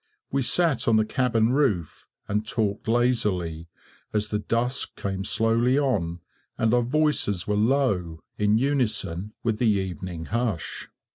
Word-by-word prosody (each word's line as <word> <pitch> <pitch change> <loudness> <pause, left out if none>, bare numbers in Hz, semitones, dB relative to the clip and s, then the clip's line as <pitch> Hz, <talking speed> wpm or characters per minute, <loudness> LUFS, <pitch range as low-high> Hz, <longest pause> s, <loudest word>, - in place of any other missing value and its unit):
We 140 - +1
sat 160 +1 +2
on 115 - +4
the 110 0 +3
cabin 115 -2 +1
roof, 110 - 0 0.2
and 105 +1 0
talked 105 -2 -2
lazily, 105 -9 0 0.5
as 105 0 0
the 105 - -1
dusk 120 +5 -1
came 95 -1 -3
slowly 115 +5 +2
on, 90 - 0 0.4
and 110 +1 +2
our 125 - +4
voices 125 - +1
were 105 - -1
low, 105 - +1
in 105 +1 +2
unison 110 -7 -1
with 110 -2 0
the 120 - +3
evening 90 -4 -3
hush. 110 -6 -3
110 Hz, 140 wpm, -25 LUFS, 95-125 Hz, 0.5 s, on